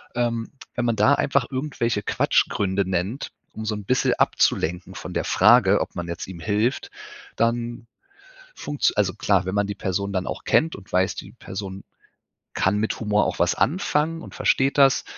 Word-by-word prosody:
Ähm, 115 -2 -1 0.2
wenn 120 - -1
man 115 -2 +1
da 140 - +4
einfach 140 -2 +1
irgendwelche 130 -6 -1
Quatschgründe 95 -1 +1
nennt, 95 +9 -2 0.2
um 110 - -6
so 110 - -1
'n 105 -1 -7
bisschen 130 +4 +2
abzulenken 90 +2 +1
von - - -7
der - - -1
Frage, - - +5
ob - - -3
man 85 0 -4
jetzt 85 0 -5
ihm 95 -3 -9
hilft, 105 - 0 0.5
dann 120 0 -1 0.7
funktz 145 -1 0
also, 100 -3 +1
klar, 100 -3 +1
wenn 95 - -3
man 100 0 +1
die 100 - -4
Person 100 +1 -2
dann 95 -1 -2
auch - - -5
kennt 160 +1 +2
und 100 0 -14
weiß, 95 +1 +1
die - - -8
Person 95 0 -7 0.7
kann 95 +3 +1
mit 110 +1 -1
Humor 105 -1 +2
auch - - -3
was - - +2
anfangen 165 - 0
und - - -11
versteht 135 +2 +1
das, 135 -1 +5
105 Hz, 180 wpm, -23 LUFS, 95-125 Hz, 0.7 s, Frage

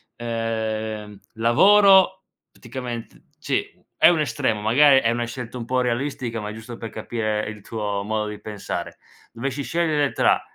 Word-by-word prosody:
ehm, 110 -3 -3
lavoro 190 - +5 0.3
praticament 120 -1 -7 0.2
ci - - -3
è - - +7
un 170 -2 +2
estremo, 115 -6 0
magari, 135 +5 +6
è 115 - +1
una 120 0 -1
scelta 120 0 -7
un 120 - -5
pò 130 +2 0
irrealistica 125 -1 -2
ma 105 0 -5
giusto 115 +2 -9
per 115 - -6
capire 110 -2 -3
il 105 -2 -9
tuo 105 -2 -3
modo 105 +1 -2
di 105 -1 -7
pensare; 105 -2 -6 0.3
dovessi 135 +4 -4
scegliere 155 -3 0
tra: - - +3
115 Hz, 150 wpm, -23 LUFS, 110-130 Hz, 0.3 s, è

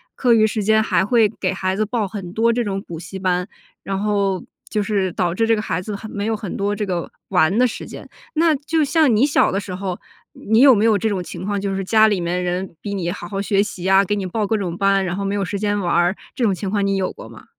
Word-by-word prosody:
课 245 -2 +3
余 220 -1 +5
时 215 0 -1
间 220 +1 +4
还 215 - +2
会 225 +1 +4
给 195 -3 -3
孩 190 0 -2
子 215 - +1
报 220 -2 -1
很 185 -3 -7
多 230 +2 +2
这 240 +1 0
种 195 -3 -2
补 165 -5 -8
习 175 +3 -8
班， 180 -1 0 0.3
然 195 -1 -3
后 200 -3 0 0.3
就 210 -2 0
是 200 -3 0
导 175 -1 0
致 225 +5 +1
这 225 - +4
个 210 - -2
孩 180 -2 -2
子 210 +2 -5
很 215 +2 -8
没 205 0 -3
有 225 - 0
很 205 -4 -6
多 205 +1 -1
这 210 - -2
个 180 -3 -3 0.2
玩 175 +7 +3
的 250 - +5
时 240 - -4
间， - - -10 0.3
那 325 0 +4
就 310 +3 0
像 300 -3 +3
你 220 +5 +4
小 290 - +3
的 195 - 0
时 200 -2 -7
候， 185 -1 -4 0.3
你 220 +2 +1
有 270 0 +8
没 210 +1 +2
有 220 -2 +4
这 220 +3 0
种 195 -3 -1
情 175 0 -8
况？ 205 0 -1
就 195 0 -2
是 195 - -2
家 220 +3 +5
里 205 -3 +1
面 175 +1 -1
人 180 0 -3
逼 205 - -4
你 175 -3 -2
好 175 -2 -7
好 195 +2 -3
学 200 -1 +2
习 200 -4 -5
呀， 190 +1 +5
给 205 - 0
你 200 -2 -3
报 210 +4 -1
各 220 - +1
种 180 -4 -3
班， 195 0 +2
然 175 0 -2
后 200 - -2
没 195 +1 -1
有 200 - 0
时 200 +2 -4
间 205 0 0
玩 175 -3 -1
儿， 175 +2 +3 0.2
这 260 - -2
种 205 - +2
情 195 +1 -4
况 200 0 0
你 195 0 +1
有 190 -1 -1
过 - - -11
吗？ - - -14
200 Hz, 305 characters per minute, -20 LUFS, 185-220 Hz, 0.3 s, 有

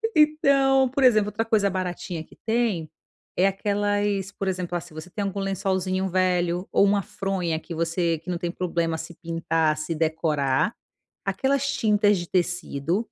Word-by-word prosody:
Então, 275 -4 +4
por 270 +1 0
exemplo, 215 -4 +5
outra 225 +2 -2
coisa 215 -3 +2
baratinha 180 -2 -3
que 155 - -15
tem, 220 -9 0 0.5
é 185 - +5
aquelas 205 0 0
por 195 -1 -4
exemplo, 180 -1 -3
ah, - - -5
se 175 -1 -14
você 155 +3 -8
tem 200 +3 -3
algum 200 0 -3
lençolzinho 190 -1 -1
velho 180 -1 +1
ou, - - +4
uma 200 0 +3
fronha 185 -5 -2
que 170 - -8
você, 165 0 0
que 165 +3 -10
não 175 - -1
tem 170 0 -3
problema 170 -3 -1
se 165 +2 -8
pintar, 165 -2 0
se 155 +2 -3
decorar, 155 - +1 0.5
aquelas 275 0 +1
tintas 210 -5 +3
de 175 - -5
tecido 175 0 0
185 Hz, 165 wpm, -25 LUFS, 170-205 Hz, 0.5 s, exemplo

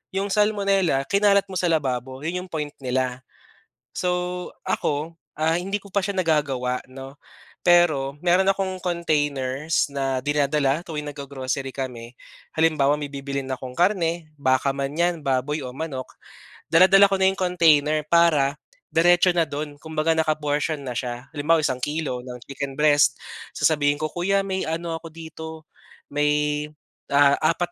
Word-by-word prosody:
yung 195 +1 -1
salmonella 200 -8 +2
kinalat 200 +3 +3
mo 185 - -2
sa 180 - +1
lababo 130 -4 -1
yun 180 +3 -2
yung 185 - -17
point 150 -2 -3
nila. 125 0 -1 0.7
So 180 0 -2 0.2
ako, 165 -3 -2 0.2
ah, 160 +2 +2
hindi 195 +3 -2
ko 200 - -14
pa 200 - +2
siya 200 - -2
nagagawa, 140 -7 0
'no. 135 +2 -10 0.5
Pero 155 -6 +3
meron 185 +2 +4
akong 190 -1 -3
containers 150 -4 0
na 135 -1 -1
dinadala 145 0 +1
tuwing 150 -3 -5
naggo-grocery 135 -1 -4
kami. 125 -3 -6 0.4
Halimbawa 150 -3 +3
may 145 - -4
bibilhin 140 -1 -4
akong 125 0 -7
karne, 170 -3 +1
baka 130 0 +2
man 140 +1 -2
yan 170 -2 +1
baboy 135 +3 0
o - - -5
manok 135 -3 -5 0.6
dala-dala 190 +4 +7
ko 195 - +1
na - - +5
'yong 190 - -4
container 155 -5 +3
para 155 -5 +3 0.4
diretso 175 +2 +4
na 175 - +2
dun 145 +1 -4
kumbaga 160 0 0
naka 155 -1 +1
portion 150 +1 -1
na 125 - -4
siya. 125 0 -4
Halimbawa 155 +2 +2
isang 130 -1 -1
kilo 145 -4 -2
ng 125 -1 -8
chicken 140 -1 -6
breast 150 -1 +4 0.4
sasabihin 145 -2 +2
ko, 155 - -2
"Kuya 195 +3 0
may 190 -3 -2
ano 165 +1 -3
ako 165 0 -10
dito 160 -1 -9 0.5
may, 150 0 +1 0.4
ah, 140 0 +5
apat 175 +2 +1
155 Hz, 150 wpm, -23 LUFS, 140-175 Hz, 0.7 s, dala-dala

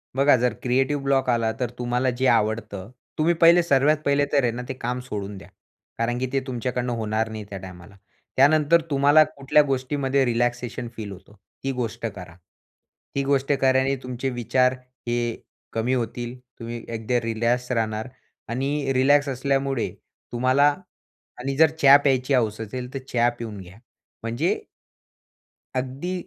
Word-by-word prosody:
बघा, 140 +1 +5
जर 125 +1 +1
creative 135 +3 +1
block 135 -1 +1
आला 115 -2 +2
तर 125 -3 -1
तुम्हाला 125 +1 0
जे 130 - +3
आवडतं, 110 -3 0 0.3
तुम्ही 160 +3 +3
पहिले 170 +1 +7
सर्वात 145 0 +3
पहिले 140 0 +3
तर 140 -2 +4
आहे 120 - +2
ना, 120 +2 -5
ते - - -2
काम 125 0 -3
सोडून 105 -5 -6
द्या. 95 -1 -13 0.5
कारण 120 +1 -1
की 130 - -1
ते 135 - +3
तुमच्याकडनं 125 0 -2
होणार 110 0 -1
नाही 110 -1 -6
त्या 100 - -6
टायमाला. 95 +1 -11 0.4
त्यानंतर 155 +4 +5
तुम्हाला 145 +2 +6
कुठल्या 150 -1 +2
गोष्टीमध्ये 135 0 0
रिलॅक्सेशन 120 0 -1
फील 105 -3 -6
होतं 95 +2 -13 0.3
ती 135 - -1
गोष्ट 115 -1 -3
करा. 95 -6 -7 0.8
ती 140 - +1
गोष्ट 140 0 +1
केल्याने 130 +1 +3
तुमचे 125 +1 -3
विचार 125 +1 +1 0.3
हे 120 0 0 0.6
कमी 115 +3 0
होतील 120 0 -3 0.2
तुम्ही 115 0 -6
एकदा 115 +2 0
रिलॅक्स 115 +2 -1
राहणार 110 -2 -1 0.4
आणि 135 +3 -1
रिलॅक्स 140 +2 +4
असल्यामुळे 135 -1 0 0.4
तुम्हाला 130 +4 +3 0.7
आणि 135 +2 -3
जर 160 0 +6
चहा 140 0 +9
प्यायची 135 -1 +1
हौस 110 -5 +1
असेल 125 +3 -6
तर 135 - -3
चहा 120 0 +3
पिऊन 110 -3 -6
घ्या. 95 +2 -13 0.5
म्हणजे 120 +9 -1 1.2
अगदी 135 +8 -4
125 Hz, 150 wpm, -24 LUFS, 115-135 Hz, 1.2 s, चहा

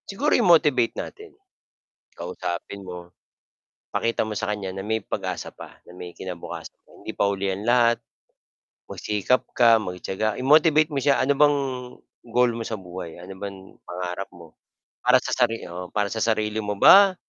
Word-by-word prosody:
Siguro 280 +10 0
i-motivate 150 - +4
natin. 425 +1 -7 0.9
Kausapin 90 +3 -5
mo. 90 -1 -9 0.8
Pakita 115 0 0
mo 105 - -4
sa 105 - -2
kanya 100 -3 -4
na 95 - -5
may 110 +1 0
pag-asa 95 -3 -4
pa, - - -13
na - - -12
may 90 -1 -8
kinabukasan. 90 -3 -8 0.3
Hindi - - -6
pa 100 - +2
huli 100 -1 -1
ang 100 +2 -5
lahat, 120 -1 +4 0.9
magsikap 105 +4 0
ka, 115 -2 +6
magtiyaga, 95 +3 -3
i-motivate 155 +3 +4
mo 140 - -1
siya. 140 +2 +3
Ano 140 +2 +3
bang 145 -1 +5 0.7
goal 125 +1 +3
mo 115 - -4
sa 110 - -3
buhay? 90 -2 -8
Ano 95 +2 -9
bang 100 -1 -6 0.3
pangarap 90 +2 -5
mo 85 -2 -15 0.5
para - - +6
sa - - -4
sari 115 - +1
oo, 90 +1 -7
para 105 -1 +1
sa 110 - -3
sarili 110 -1 0
mo 105 -1 -3
ba 195 - +8
105 Hz, 160 wpm, -24 LUFS, 95-125 Hz, 0.9 s, ba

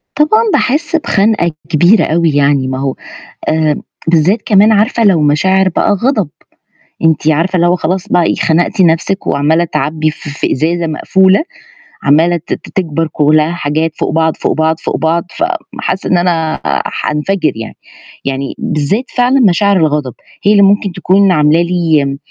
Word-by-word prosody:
طبعًا، 305 +10 +3
باحس 300 +5 0
بخَنقة 210 - +1 0.2
كبيرة 175 +6 +3
أوي 165 0 +1
يعني 140 -2 +1
ما 130 0 -3
هو 135 -1 -2 0.5
آآ، 155 -2 0 0.2
بالذّات 170 +6 +2
كمان 210 +1 +4
عارفة 220 +2 +1
لو 190 -6 +3
مشاعر 190 +6 +2
بقى 185 +3 0
غَضَب، 210 - 0 0.8
أنتِ 160 -1 +1
عارفة 170 +5 0
اللي 175 0 +2
هو 175 - +2
خلاص 180 +2 -3
بقى 175 - +2
إيه - - 0
خنقتِ 170 +4 0
نَفْسِك 170 +3 0
وعمّالة 155 +4 +1
تعبّي 155 0 -2
ف 150 - -16
في 140 - -3
إزازة 165 +4 -1
مقفولة، 190 - +2 0.6
عمّالة 165 +5 +3
ت 165 - -6
ت - - -8
تكبر 165 -3 -1
كلّها 155 +2 +2
حاجات 160 -1 -2
فوق - - -1
بعض، 160 0 0
فوق - - -1
بعض، 160 +1 0
فوق - - -3
بعض، 165 +3 0
فم 335 - +1 0.4
حاسّة 190 - -3
إن 180 - +3
أنا 165 -3 0
آآ، - - -2
حانفجر 155 +4 -1
يعني، 115 0 -8 0.5
يعني 135 0 -3
بالذّات 180 - -2
فعلًا 250 +2 +2
مشاعر 200 -2 +3
الغضب 150 -6 0 0.3
هي 200 - +3
اللي 200 -1 +5
ممكن 200 0 +2
تكون 190 +2 +2
عاملة 150 0 +3
لي 160 -6 0
170 Hz, 165 wpm, -12 LUFS, 155-195 Hz, 0.8 s, اللي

